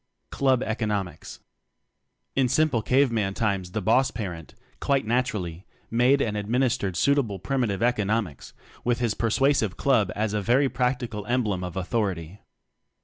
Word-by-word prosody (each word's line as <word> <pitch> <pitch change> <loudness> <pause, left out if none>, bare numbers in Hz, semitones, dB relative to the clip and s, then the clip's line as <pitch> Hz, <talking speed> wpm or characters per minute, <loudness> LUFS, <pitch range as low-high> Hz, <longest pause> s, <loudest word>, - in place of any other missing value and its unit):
Club 130 -2 +2
Economics. 105 -5 -3 0.9
In 130 -2 +2
simple 145 -3 +2
cave 130 +3 +3
man 100 -4 -1
times 100 -5 -1
the 110 - -2
boss 130 +6 +3
parent, 90 - -7 0.2
quite 140 -3 +1
naturally, 105 -8 -1 0.3
made 125 +4 +3
and 105 -2 -2
ad 105 -1 -3
mmistered 120 -5 0
suitable 135 -5 +1
primitive 115 -2 -1
eco 120 -3 +2
nomics 100 - -2 0.3
with 120 -1 +1
his 120 -3 0
persuasive 115 -3 +1
club 115 -9 +2
as 105 0 -1
a 105 - 0
very 130 +6 +3
practical 125 -4 -2
emblem 110 -7 0
of 90 0 -6
authority. 95 -3 -2
115 Hz, 145 wpm, -25 LUFS, 100-125 Hz, 0.9 s, cave